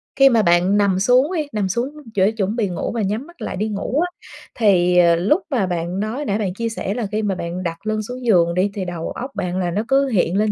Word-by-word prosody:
khi 270 0 +6
mà 230 -3 +3
bạn 180 +2 +3
nằm 195 -2 +2
xuống 255 - +3
đi 310 -3 -1
nằm 205 -3 -1
xuống 240 +7 -1 0.3
để 195 +2 +3
chuẩn 210 0 -2
bị 215 -5 0
ngủ 175 - -3
và 235 - -2
nhắm 215 - -2
mắt 345 0 -18
lại - - -4
đi 210 +3 -1
ngủ 215 +7 -2
á, 355 - +1 0.5
thì, 180 -5 +3
ờ, 170 -1 +6
lúc 210 - +2
mà 235 -9 +1
bạn 175 +1 -3
nói 230 +8 -3
nãy 205 -4 0
bạn 195 -4 -2
chia 230 +3 -3
sẻ 205 -3 -3
là 235 -3 -3
khi 215 +1 0
mà 200 -2 0
bạn 175 +1 -5
đặt 170 +4 -5
lưng 215 0 0
xuống 250 +3 -7
giường 170 -6 +4
đi, 190 +3 +1
thì 195 -2 -4
đầu 175 -2 -5
óc 260 +2 -6
bạn 180 0 -2
là 175 -1 -1
nó 205 +4 0
cứ 275 +1 +3
hiện 195 -6 +1
lên 215 0 +2
205 Hz, 270 wpm, -20 LUFS, 180-235 Hz, 0.5 s, khi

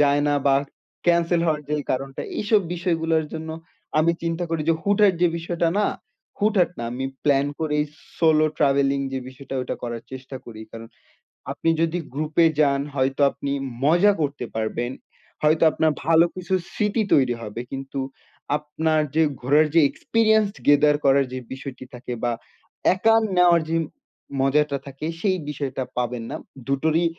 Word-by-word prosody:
যায় 145 0 +4
না 145 - +2
বা 135 - +5 0.5
ক্যানসেল 170 0 +3
হওয়ার 150 -2 0
যে 150 - 0 0.2
কারণটা 135 +1 -3 0.2
এইসব 210 0 +3
বিষয়গুলোর 165 -2 0
জন্য 160 0 -5 0.5
আমি 165 +2 +4
চিন্তা 165 +1 -1
করি 165 -2 -1
যে, 165 - +5
হুট-হাট 200 -1 +4
যে 175 - +6
বিষয়টা 170 0 -1
না, 210 - +3 0.5
হুট-হাট 205 -4 +3
না 120 - -3
আমি 130 +2 -4 0.2
প্লান 140 -1 +3
করেই 150 -1 +1 0.3
সোলো 155 -2 +4
ট্রাভেলিং 140 0 +2
যে 135 - -1
বিষয়টা 135 +1 -9
ওইটা 125 - -4
করার 120 -1 -4
চেষ্টা 130 +1 -7
করি, 110 -2 -10
কারণ 115 0 -9 0.6
আপনি 165 - -1
যদি 165 +1 +1 0.2
গ্রুপে 155 +3 +2
যান 140 -2 +3
হয়তো 135 +1 0
আপনি 140 - -5 0.3
মজা 175 +7 +5
করতে 145 -4 -2
পারবেন। 115 +2 -2 0.5
হয়তো 155 +2 +4
আপনার 160 -1 +2
ভালো 165 +1 +5
কিছু 185 +1 -4 0.2
স্মৃতি 210 +1 0
তৈরি 130 -4 +3
হবে 110 +1 -5
কিন্তু 135 0 -5 0.6
আপনার 155 +1 0
যে 160 - +5 0.2
ঘুরার 145 +5 +4
যে - - +8
এক্সপেরিয়েন্স 220 -2 +2 0.2
গেদার 145 +1 +5
করার 135 0 +5
যে 130 - -3
বিষয়টি 130 -1 -8
থাকে, 125 0 -6
বা 120 - +2 0.6
একা 225 +4 +3 0.2
নেওয়ার 175 -2 +5
যে 165 - +1 0.6
মজাটা 140 +1 +2
থাকে 140 +2 -7 0.2
সেই 190 -3 +2
বিষয়টা 135 -2 -3
পাবেন 125 -1 -2
না। - - -4 0.3
২ 140 - +1
টোরই 160 +2 +2
150 Hz, 155 wpm, -23 LUFS, 135-170 Hz, 0.6 s, যে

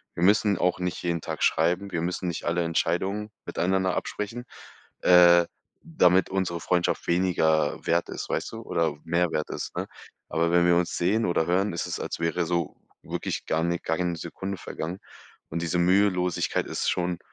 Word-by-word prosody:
Wir 85 - -4
müssen 105 +1 +4
auch 90 0 +1
nicht 90 -1 -3
jeden 85 -2 -1
Tag - - -5
schreiben. 90 +5 +1
Wir 85 - -1
müssen 90 +2 -2
nicht 85 - -4
alle 85 +1 +1
Entscheidungen 95 +5 -1
miteinander 95 +1 0
absprechen, 115 +4 -4 0.6
äh, 85 -1 +7 0.4
damit 125 - +3
unsere 95 -3 -1
Freundschaft 90 -1 0
weniger 80 -4 +1
wert 85 +1 +2
ist, - - -6
weißt - - -2
du, 115 - -6
oder 80 -8 -1
mehr 85 0 +1
wert 75 - -2
ist, - - -5
ne? - - -3 0.4
Aber 85 +1 +1
wenn 85 0 +4
wir 85 - +5
uns 85 0 0
sehen 105 +6 +1
oder 85 -2 +1
hören, 95 +2 +1
ist 85 - -3
es, - - -4
als - - -4
wäre 85 +1 0
so 85 -2 -2 0.3
wirklich - - -4
gar 80 +1 +1
ni 85 0 0
gar 80 0 0
keine 90 -1 -1
Sekunde 95 +4 -5
vergangen. 85 +4 -6 0.5
Und 85 +1 -3
diese 85 +1 -1
Mühelosigkeit 90 0 +2
ist - - -1
schon 90 -1 -1
90 Hz, 180 wpm, -26 LUFS, 85-95 Hz, 0.6 s, äh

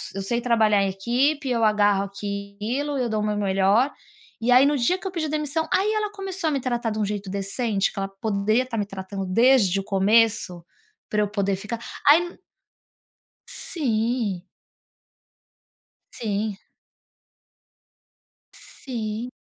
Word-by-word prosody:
eu 195 - -3
sei 235 +5 -1
trabalhar 220 -4 +3
em 195 - 0
equipe, 260 +9 0
eu 235 -2 +1
agarro 205 -2 +3
aquilo, 205 +8 -4
eu 250 -2 -1
dou 215 -1 -1
o - - -2
meu 210 0 -1
melhor 200 +6 +2 0.5
e 245 - +1
aí 255 +2 +7
no 290 0 +2
dia 255 +10 +2
que 385 - -6
eu - - -4
pedi 325 -4 -2
demissão, 305 +1 -1
aí 410 +3 +2
ela 425 -1 -1
começou 385 -4 -3
a - - -1
me 280 - 0
tratar 240 -2 -1
de 215 - -3
um 210 - +1
jeito 205 -1 -4
decente, 200 +2 -1
que - - -19
ela 195 - -2
poderia 210 +4 0
estar 245 -3 -5
me 205 - 0
tratando 195 0 -6
desde 205 -1 +4
o - - -4
começo, 205 -2 +2 0.5
pra 210 - +1
eu 210 - +1
poder 200 -2 0
ficar 210 +4 -5 0.3
aí 345 +4 +5 1.1
Sim. 235 - -1 1.7
Sim. 210 -2 -3 2.0
Sim. 230 -2 -6
220 Hz, 150 wpm, -24 LUFS, 200-260 Hz, 2.0 s, aí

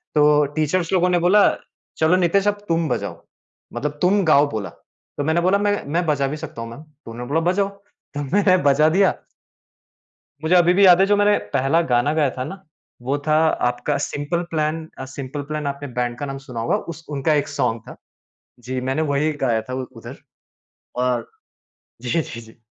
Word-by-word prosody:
तो 150 0 +5
टीचर्स 165 +3 0
लोगों 180 0 +3
ने 175 - +2
बोला 190 +4 +5 0.5
चलो 160 +3 +3
नितेश 185 +3 +2
अब 205 0 -1
तुम 165 -1 +1
बजाओ, 125 - -4 0.5
मतलब 150 +4 -4
तुम 195 +3 +3
गाओ 145 -2 +4
बोला। 105 -3 -4 0.5
तो 145 - -1
मैंने 160 +3 +1
बोला 185 +3 +3
मैं 205 0 0
मैं 175 0 +1
बजा 145 -3 +1
भी 150 +3 -4
सकता 155 -5 -8
हूँ 115 - -6
मैम 115 - -10
मै 155 - -14 0.3
उन्होंने 120 +1 -7
बोला 155 +3 +2
बजाओ, 195 +1 +1
तो 200 -7 -10
मैंने 185 +6 +3
बजा 145 +2 +4
दिया। 190 +3 +3 1.3
मुझे 160 +3 +2
अभी 175 -1 +5
भी 200 +1 +5
याद 180 -1 +7
है - - +6
जो 205 - +3
मैंने 205 0 +4 0.2
पहला 135 +6 +2
गाना 125 0 +1
गाया 150 -4 +2
था 130 - -5
ना, 190 +7 -8 0.4
वो 135 +3 -1
था 155 - +3 0.3
आपका 125 +4 -2
सिंपल 145 +4 -3
प्लान। 155 0 -2
अ, 130 - -5
सिंपल 140 +1 -5
प्लान 150 -1 -3
आपने 140 0 -4
बैंड 120 0 -1
का 145 - -4
नाम 135 0 -5
सुना 120 -3 -5
होगा 115 - +1 0.2
उस 165 - -15
उनका 150 +3 +1
एक 145 - 0
सॉन्ग 115 0 -1
था, - - -10 0.6
जी, 130 +1 -4
मैंने 135 +5 -1
वही 150 +3 +1
गाया 115 -3 +1
था - - -5 0.2
उधर 115 -2 -10 0.9
और 125 -2 -1 0.7
जी, 125 - -5
जी, 115 -5 -8
जी। 110 +1 -17
150 Hz, 195 wpm, -21 LUFS, 130-175 Hz, 1.3 s, याद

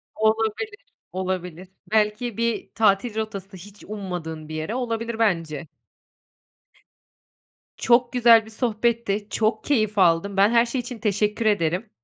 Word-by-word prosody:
Olabilir. 225 - -1 0.3
Olabilir. 185 -1 -4 0.2
Belki 215 +1 +1
bir 230 -1 -1
tatil 210 +1 +2
rotası, 200 -3 -5
hiç 200 +3 -14
ummadığın 175 -7 -6
bir 155 - -5
yere 155 +9 -3
olabilir 230 -2 -3
bence. 165 -8 0 2.1
Çok 240 +1 +3
güzel 230 -2 +6
bir - - -12
sohbetti. 225 -2 -1
Çok 220 +1 0
keyif 215 -7 0
aldım. 185 +2 +3
Ben 200 +2 +5
her 235 0 +4
şey 245 +2 -2
için 245 -1 -8
teşekkür 210 +1 0
ederim. 190 0 +1
215 Hz, 125 wpm, -23 LUFS, 190-230 Hz, 2.1 s, güzel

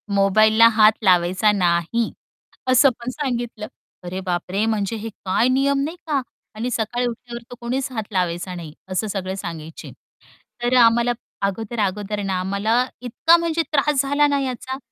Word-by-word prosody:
मोबाईलला 215 +3 +5
हात 215 0 +6
लावायचा 185 +2 +3
नाही 180 +4 +1 0.6
असं 270 +2 +6
पण 240 +1 -5
सांगितलं, 240 -6 -4 0.4
अरे 180 +2 -5
बापरे! 185 +3 -1
म्हणजे 215 -1 -1
हे 225 +2 -5
काय 200 +3 0
नियम 275 +2 +2
नाही 325 +4 -4
का 285 -3 +1 0.3
आणि 235 +3 -3
सकाळी 240 +2 -1
उठल्यावर 240 0 -7
तर - - -7
कोणीच 255 +3 -2
हात 220 -4 -3
लावायचा 180 -1 -2
नाही, 165 -4 -8 0.2
असं 185 +4 -1
सगळे 190 -2 -3
सांगायचे 165 -4 -7 0.7
तर 245 +1 +2
अ, - - +7
आम्हाला 235 +1 +4 0.4
अगोदर, 220 +3 -5
अगोदर 205 +1 -1
ना 190 -1 -1
आम्हाला 205 +6 +1 0.2
इतका 320 +7 +3
म्हणजे 335 -1 0
त्रास 295 -1 +2
झाला 285 +2 +2
ना 285 -1 +1
याचा. 260 0 -4
220 Hz, 155 wpm, -21 LUFS, 190-250 Hz, 0.7 s, अ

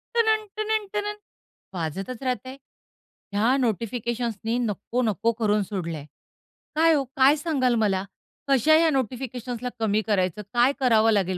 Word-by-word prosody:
टनन-टनन-टनन 430 -2 0 0.6
वाजतच 190 - -4
राहतंय. 255 +1 -3 0.8
ह्या 225 +6 +3
नोटिफिकेशन्स 235 0 -1
नी 230 +2 +1
नको-नको 225 0 0
करून 210 -1 +2
सोडलंय. 170 -7 -5 0.7
काय 325 +1 +5
हो? 285 -3 +2
काय 270 +2 +6
सांगाल 280 -6 +1
मला? 190 -2 0 0.4
कशा 275 +3 +4
ह्या 325 0 +4
नोटिफिकेशन्सला 250 -2 -3
कमी 215 -1 +1
करायचं? 190 -2 0
काय 240 +2 +4
करावं 225 -4 +4
लागेल 190 -3 +1
240 Hz, 115 wpm, -25 LUFS, 210-275 Hz, 0.8 s, काय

